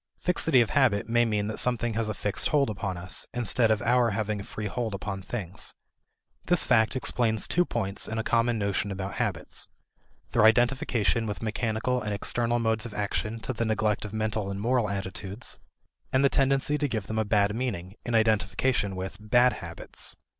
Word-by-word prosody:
Fixity 160 -7 +3
of 115 - 0
habit 125 -9 +3
may 120 +1 +3
mean 105 -2 0
that 110 +1 -1
something 120 -2 +1
has 110 0 -1
a 105 - -3
fixed 105 +1 0
hold 140 -6 +2
upon 100 -3 -3
us, 90 0 -4
instead 120 -1 +2
of 110 +1 +1
our 120 0 +3
having 105 0 -1
a - - -5
free 105 +1 -6
hold 110 0 -2
upon 100 0 -4
things. 95 -3 -5 0.7
This 175 -1 +3
fact 110 0 +3
explains 115 -4 +1
two 175 +1 +2
points 100 - -2
in 110 - -4
a 110 - 0
common 115 0 +2
notion 100 -1 -1
about 95 0 -4
habits: - - -2 0.6
their - - +3
identification 120 -1 +3
with 105 +2 -4
mechanical 115 +3 -1
and 105 -2 -2
external 120 +3 0
modes 110 0 0
of 105 - -11
action 105 +2 -2
to 115 +4 -3
the 115 - -1
neglect 110 -1 0
of 105 - -6
mental 110 -2 -1
and 100 0 -4
moral 120 0 +1
attitudes, 95 +2 -4 0.5
and 130 +1 +3
the - - +5
tendency 135 +2 +2
to 145 - +1
give 110 -5 -2
them 110 +2 -2
a - - +2
bad 105 -1 +2
meaning, 100 -7 -3
an 120 - -1
identification 110 -1 +2
with 95 +1 -5
"bad 120 +4 +4
habits." 85 -1 -7
110 Hz, 190 wpm, -27 LUFS, 100-120 Hz, 0.7 s, the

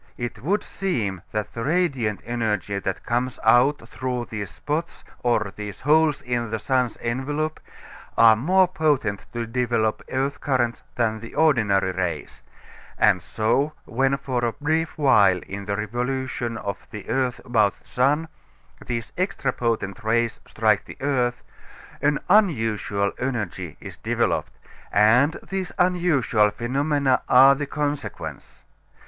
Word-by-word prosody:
It 120 -3 -5
would 195 - 0
seem 110 - -2
that 105 -1 -3
the 115 - -4
radiant 140 - 0
energy 105 -4 -1
that 95 -1 -4
comes 125 +1 -1
out 125 +6 +4
through 125 -2 -3
these 105 -3 -4
spots 155 - -4 0.2
or 110 -5 +1
these 105 -2 -7
holes 150 0 +3
in 120 -2 -2
the 110 - -1
sun's 125 0 0
envelope, 145 +6 -2 0.6
are 115 -1 +8
more 185 - +3
potent 150 - 0
to 120 -1 -2
develop 115 -2 0
earth 135 +2 -2
currents 120 -4 0
than 110 -2 0
the 115 +1 -10
ordinary 110 -12 +3
rays; 90 -2 -4 0.6
and 105 -4 +4
so, 135 +7 0
when 135 +3 +1
for 130 -3 -2
a 115 -1 +1
brief 160 +2 -1
while 105 -11 +5
in 100 +1 -6
the 100 0 -2
revolution 120 +2 -2
of 100 -2 -4
the 105 -3 -9
earth 130 -2 0
about 110 -5 +2
the - - -28
sun, 145 +6 +1 0.6
these 115 -2 -4
extra 185 -9 0
potent 115 -3 -2
rays 115 +1 +1
strike 110 -2 +2
the - - -11
earth, 125 -3 0 0.6
an 145 0 +2
unusual 115 - +2
energy 120 - -3
is - - -10
developed, - - -1 0.3
and 125 +9 +4
these 190 -1 -2
unusual 160 -12 +3
phenomena 135 +4 +1
are 135 +2 +8
the 145 +1 -3
consequence. 145 0 -5
120 Hz, 135 wpm, -24 LUFS, 110-145 Hz, 0.6 s, are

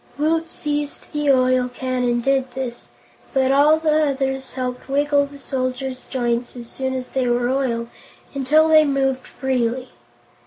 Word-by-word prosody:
Woot 325 +2 +1
seized 295 -2 -4
the 295 -1 0
oil 255 -1 +3
can 255 0 -2
and 240 -1 +1
did 270 -1 +1
this, 250 -2 -5 0.5
but 265 0 +3
all 290 +3 +5
the 310 -1 +2
others 265 -1 -2
helped 250 0 -4
wiggle 285 0 +2
the 285 0 -13
soldier's 255 -1 -3
joints 240 -2 -2
as 240 -1 -8
soon 260 +2 -3
as 255 -1 -5
they 260 -2 0
were 240 0 +1
oiled, 250 -3 -1 0.5
until 295 +3 +3
they 315 -1 +7
moved 270 -2 0
freely. 255 -1 -1
265 Hz, 155 wpm, -21 LUFS, 255-285 Hz, 0.5 s, they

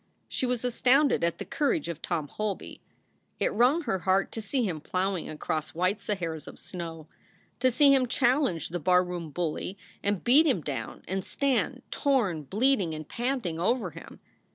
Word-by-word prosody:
She 255 - -1
was 250 -1 -1
astounded 255 - +3
at 170 0 +1
the - - -6
courage 295 +1 0
of 170 -2 -5
Tom 160 -4 -2
Holby. 210 +4 -4 0.6
It - - +1
wrung 255 +10 +3
her 225 -8 -1
heart 190 +2 +1
to 225 - -4
see 245 +5 -1
him 170 -8 -2
plowing 185 +1 -1
across 155 0 -3
white 185 +4 +1
Saharas 170 -7 -3
of - - -10
snow, 165 -3 -7 0.5
to 255 - +4
see 275 +3 +6
him 260 -2 +3
challenge 245 - +1
the 175 +1 -3
barroom 180 0 +1
bully 175 +4 -3 0.2
and 200 -2 -1
beat 285 +7 +6
him 245 - +2
down 145 -3 -5
and 190 0 -2
stand, 275 +3 0
torn, 235 - +1
bleeding, 200 - +1
and 155 -1 -7
panting, 240 -10 -2
over 195 0 +1
him. 165 - -12
195 Hz, 170 wpm, -28 LUFS, 170-250 Hz, 0.6 s, see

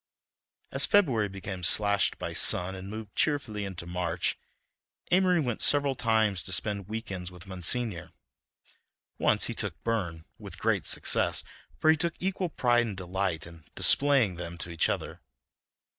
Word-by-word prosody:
As - - +4
February 130 - +2
became 95 -1 -7
slashed 100 +3 +4
by - - -5
sun 90 +1 +3
and 95 0 -8
moved 110 -1 -9
cheerfully 125 -9 0
into 95 -3 -7
March, 90 -1 -2 0.8
Amory 180 -1 +3
went 125 -7 -2
several 145 -1 +4
times 110 -6 0
to 95 - -6
spend 100 0 -1
week 110 0 -6
ends 90 -2 -5
with 90 0 -13
Monsignor; 95 +1 0 1.1
once - - +2
he - - -3
took - - -5
Burne, 90 -9 -3
with - - -10
great - - -1
success, - - +2 0.3
for 155 - +4
he 160 - +2
took 170 +1 -1
equal 190 -1 -2
pride 120 -5 +1
and 100 -4 -6
delight 95 -3 -3
in 85 -2 -14
displaying 135 -10 +4
them 85 0 -7
to 85 0 -7
each 85 - +1
other. - - -4
100 Hz, 155 wpm, -28 LUFS, 90-125 Hz, 1.1 s, As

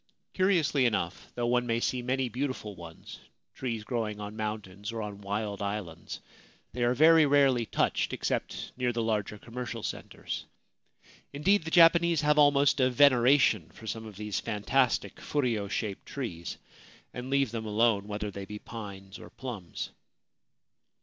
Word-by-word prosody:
Curiously 165 -9 +3
enough, 90 -6 -2
though 120 - -1
one 125 0 +1
may 115 0 +1
see 125 +1 -1
many 130 +1 0
beautiful 125 -4 -4
ones, 85 -2 -11 0.3
trees 115 -4 -4
growing 110 -3 -3
on 105 +1 -6
mountains 105 -1 -4
or 115 - -5
on 100 -1 -7
wild 100 0 -3
islands, 100 -5 -5 0.5
they 120 +1 -1
are 120 +1 +2
very 160 +2 +6
rarely 135 -5 +4
touched - - 0
except - - -3
near 125 -1 0
the 115 -1 -1
larger 105 -2 -1
commercial 120 0 -6
centres. - - -5 0.9
Indeed, 170 +6 +2
the - - -3
Japanese 170 -1 +6
have 150 0 +3
almost 145 -1 +5
a 130 -1 +4
veneration 125 - +4
for 110 - -14
some 110 +1 -4
of 105 - -11
these 105 0 -3
fantastic 115 -1 0
furyo 120 -8 -1
shaped 105 -1 -3
trees, 90 - -5 0.6
and 125 +1 -6
leave 135 -3 +2
them 110 -2 -4
alone, 105 -1 +2
whether 105 0 -4
they 100 0 -7
be 105 +2 -7
pines 100 -3 -9
or - - -11
plums. 115 -10 -6
115 Hz, 150 wpm, -29 LUFS, 105-135 Hz, 0.9 s, very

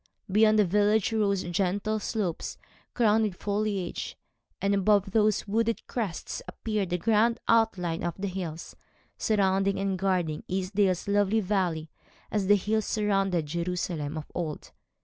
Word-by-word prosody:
Beyond 215 +2 +5
the 210 - +5
village 205 +3 +2
rose 200 -3 +1
gentle 195 +5 -1
slopes, 205 -6 -3 0.4
crowned 220 -2 +4
with 200 -4 -3
foliage, 205 -2 -2 0.4
and 200 0 +1
above 200 0 +3
those 215 -1 +2
wooded 225 +2 0
crests 210 -9 -4
appeared 210 -4 -2
the 180 - 0
grand 225 +4 +2
outline 195 -8 +2
of 175 - -2
the 200 +1 -3
hills, 175 -4 -6 0.4
surrounding 195 -2 +2
and 195 -1 -1
guarding 180 -5 0
Easedale's 190 0 0
lovely 205 +1 +2
valley, 180 -6 -1 0.4
as 205 -3 0
the 205 - +7
hills 215 +2 0
surrounded 195 -5 +1
Jerusalem 170 -2 -3
of 155 - -5
old. 160 -4 -4
195 Hz, 135 wpm, -28 LUFS, 180-215 Hz, 0.4 s, the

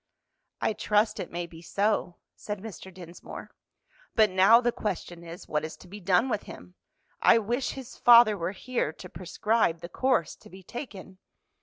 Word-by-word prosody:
"I - - +1
trust 210 0 +1
it - - -5
may 175 0 -4
be 165 -1 -13
so," 195 0 0 0.2
said 210 0 -5
Mr. 195 -2 -9
Dinsmore. 175 -1 -10 0.6
"But 215 -3 +5
now 195 +5 +6
the 240 0 +1
question 175 -6 -5
is, 170 +1 -10
what 150 0 -1
is 155 - -6
to - - -15
be 205 +4 -9
done 190 +5 +2
with 215 -5 -1
him? 90 0 -11 0.5
I - - +6
wish 240 +4 -1
his 265 -3 -10
father 235 -3 +7
were 170 -1 -3
here 240 -4 -2
to - - -11
prescribe 185 +1 0
the 170 - -7
course 250 - 0
to - - -17
be 190 +1 -13
taken." 190 -5 -9
195 Hz, 175 wpm, -28 LUFS, 175-225 Hz, 0.6 s, father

